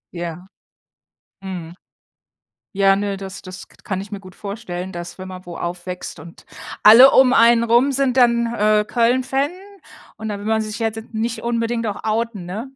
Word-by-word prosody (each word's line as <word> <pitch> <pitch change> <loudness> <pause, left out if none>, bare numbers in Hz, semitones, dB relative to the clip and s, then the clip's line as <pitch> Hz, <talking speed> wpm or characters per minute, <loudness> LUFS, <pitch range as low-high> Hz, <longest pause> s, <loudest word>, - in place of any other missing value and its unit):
Ja, 170 +1 -6 1.0
mhm, 175 -3 -7 1.0
ja, 195 0 +4
ne, 200 0 -2
das 195 0 -8
das 185 0 -10
k - - -24
kann 190 -2 -3
ich 200 +2 -10
mir 200 - -5
gut 185 -2 -14
vorstellen, 190 -3 -6
dass, 175 +1 -8
wenn 185 - -7
man 185 0 -9
wo 175 -1 -8
aufwächst 175 -1 -6
und 165 +1 -14 0.4
alle 240 +6 +10
um 260 -1 +5
einen 235 -1 +5
rum 240 +4 +3
sind 270 -1 0
dann, 235 -2 +4
äh, 210 -1 +2
Köln-Fan 260 +5 +1 0.7
und 220 0 -6
dann 205 - -4
will 205 - -8
man 220 0 +1
sich 215 +1 -6
ja 225 -1 0 0.2
nicht 225 +1 -3
unbedingt 230 -1 -1
auch 205 - -6
outen, 220 -3 -2
ne? 215 +9 -6
210 Hz, 175 wpm, -20 LUFS, 185-235 Hz, 1.0 s, alle